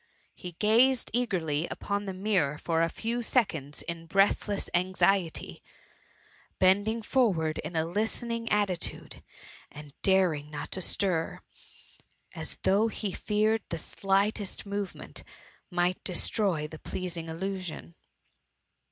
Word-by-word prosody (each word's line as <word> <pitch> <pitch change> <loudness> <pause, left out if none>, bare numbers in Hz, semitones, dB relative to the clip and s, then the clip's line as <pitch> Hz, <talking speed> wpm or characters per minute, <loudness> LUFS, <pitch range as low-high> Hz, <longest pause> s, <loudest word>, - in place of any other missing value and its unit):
He 180 -1 -8
gassed 235 +7 +3
eagerly 175 -10 0
upon 205 0 -2
the 190 - -3
mirror 185 -7 +1
for 165 +1 0
a 165 - +3
few 230 +6 -2
seconds 165 - 0
in 165 -1 -5
breathless 195 +2 +2
anxiety, 185 0 +1 1.0
bending 205 +4 +3
forwards 185 - +2
in 160 +3 -6
a 160 0 +2
listening 230 +5 -2
attitude, 200 -4 -1 0.5
and 150 0 -10
not 140 - -27
daring 160 -6 +2 0.2
to 190 - -1
stir, 175 -3 0 0.9
as - - -5
though 205 +4 +4
he 215 -2 -3
feared 215 +3 +1
the 170 - -2
slightest 195 +4 0
movement 200 -2 -5 0.5
might 175 0 0
destroy 180 -3 +1
the 155 0 -10
pleasing 175 -3 -4
illusion. 175 - -5
190 Hz, 115 wpm, -29 LUFS, 165-210 Hz, 1.0 s, though